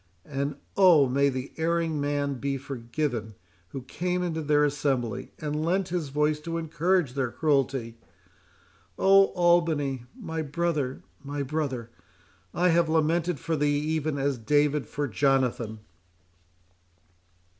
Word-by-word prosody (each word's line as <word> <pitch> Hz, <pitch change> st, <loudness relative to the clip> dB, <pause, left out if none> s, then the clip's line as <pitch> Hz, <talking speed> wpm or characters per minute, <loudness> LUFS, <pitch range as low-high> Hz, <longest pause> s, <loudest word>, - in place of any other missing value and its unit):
—And, 140 Hz, 0 st, -3 dB, 0.2 s
oh! 175 Hz, -8 st, +6 dB
may 140 Hz, +2 st, +2 dB
the 130 Hz, 0 st, -4 dB
erring 165 Hz, -2 st, 0 dB
man 145 Hz, -2 st, -1 dB
be 140 Hz, +1 st, -1 dB
forgiven 120 Hz, -3 st, -4 dB, 0.3 s
who 130 Hz, +6 st, -7 dB
came 180 Hz, +7 st, -2 dB
into 165 Hz, -2 st, -2 dB
their 150 Hz, 0 st, +3 dB
assembly, 130 Hz, -4 st, -1 dB
and 150 Hz, 0 st, -3 dB
lent 185 Hz, +3 st, 0 dB
his 170 Hz, -5 st, -2 dB
voice 150 Hz, +2 st, +1 dB
to 165 Hz, +2 st, -4 dB
encourage 165 Hz, -2 st, 0 dB
their, 135 Hz, -2 st, -1 dB
cruelty!—Oh! 135 Hz, -, 0 dB
Albany, 165 Hz, -8 st, +2 dB
my 165 Hz, -7 st, -4 dB
brother, 150 Hz, -3 st, -2 dB, 0.2 s
my 145 Hz, 0 st, -3 dB
brother, 135 Hz, -5 st, -3 dB, 0.6 s
I 180 Hz, +2 st, +2 dB
have 170 Hz, -1 st, +3 dB
lamented 165 Hz, +1 st, +1 dB
for 165 Hz, +4 st, -2 dB
thee 145 Hz, -1 st, +1 dB
even 155 Hz, 0 st, -1 dB
as 140 Hz, -2 st, -1 dB
David 145 Hz, +4 st, +1 dB
for 145 Hz, 0 st, -2 dB
Jonathan!" 125 Hz, -4 st, 0 dB
145 Hz, 125 wpm, -27 LUFS, 135-165 Hz, 0.6 s, oh